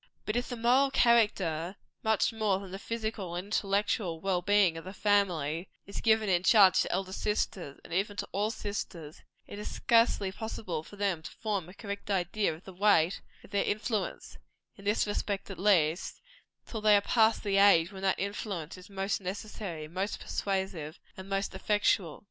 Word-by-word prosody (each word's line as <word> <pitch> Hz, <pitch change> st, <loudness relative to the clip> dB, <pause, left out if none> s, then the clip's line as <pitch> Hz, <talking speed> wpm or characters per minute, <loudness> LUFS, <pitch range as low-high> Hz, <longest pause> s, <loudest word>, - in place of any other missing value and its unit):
But 215 Hz, -, -2 dB
if 245 Hz, +1 st, -1 dB
the 245 Hz, -, -3 dB
moral 250 Hz, +4 st, +3 dB
character, 200 Hz, -, +2 dB, 0.3 s
much 220 Hz, +1 st, +2 dB
more 215 Hz, -4 st, +1 dB
than 195 Hz, -1 st, -9 dB
the 195 Hz, -, -6 dB
physical 220 Hz, -6 st, -4 dB
and 180 Hz, +2 st, -4 dB
intellectual 200 Hz, -4 st, 0 dB
well 185 Hz, 0 st, 0 dB
being 200 Hz, -3 st, +3 dB
of 165 Hz, -, -7 dB
the 190 Hz, +2 st, -8 dB
family, 180 Hz, -6 st, +1 dB, 0.2 s
is 200 Hz, -, -6 dB
given 220 Hz, -1 st, +3 dB
in 180 Hz, -2 st, +3 dB
charge 195 Hz, -1 st, +6 dB
to -, -, -2 dB
elder 190 Hz, 0 st, -2 dB
sisters, 190 Hz, -8 st, -2 dB
and -, -, -10 dB
even 200 Hz, +3 st, -1 dB
to -, -, -3 dB
all 205 Hz, +2 st, 0 dB
sisters, 190 Hz, -8 st, -6 dB, 0.2 s
it 205 Hz, -, -9 dB
is 210 Hz, -, -5 dB
scarcely 230 Hz, -4 st, +3 dB
possible 190 Hz, -6 st, -4 dB
for 180 Hz, -, -13 dB
them 200 Hz, -5 st, -1 dB
to -, -, -8 dB
form 200 Hz, -6 st, -3 dB
a 185 Hz, -, -13 dB
correct 200 Hz, -1 st, -7 dB
idea 195 Hz, +1 st, +1 dB
of 160 Hz, +3 st, -10 dB
the 190 Hz, -, -11 dB
weight 185 Hz, -2 st, +3 dB, 0.2 s
of -, -, -16 dB
their 200 Hz, -, +1 dB
influence, 210 Hz, -1 st, -3 dB, 0.4 s
in 200 Hz, -, -15 dB
this 210 Hz, +2 st, +2 dB
respect 205 Hz, -1 st, -3 dB
at 185 Hz, -, -8 dB
least, 180 Hz, -4 st, +2 dB, 0.5 s
till 220 Hz, -, -6 dB
they 210 Hz, -1 st, +6 dB
are -, -, +2 dB
past 220 Hz, +1 st, +3 dB
the 200 Hz, -2 st, +1 dB
age 195 Hz, -4 st, +6 dB
when 190 Hz, -1 st, -9 dB
that 195 Hz, -1 st, +1 dB
influence 195 Hz, -4 st, -4 dB
is 180 Hz, -, -14 dB
most 195 Hz, +1 st, -2 dB
necessary, 190 Hz, -4 st, -5 dB
most 185 Hz, +6 st, -3 dB
persuasive, 190 Hz, -6 st, -3 dB, 0.2 s
and 190 Hz, +1 st, -10 dB
most 195 Hz, 0 st, -1 dB
effectual. 190 Hz, -4 st, +1 dB
195 Hz, 185 wpm, -30 LUFS, 180-210 Hz, 0.5 s, charge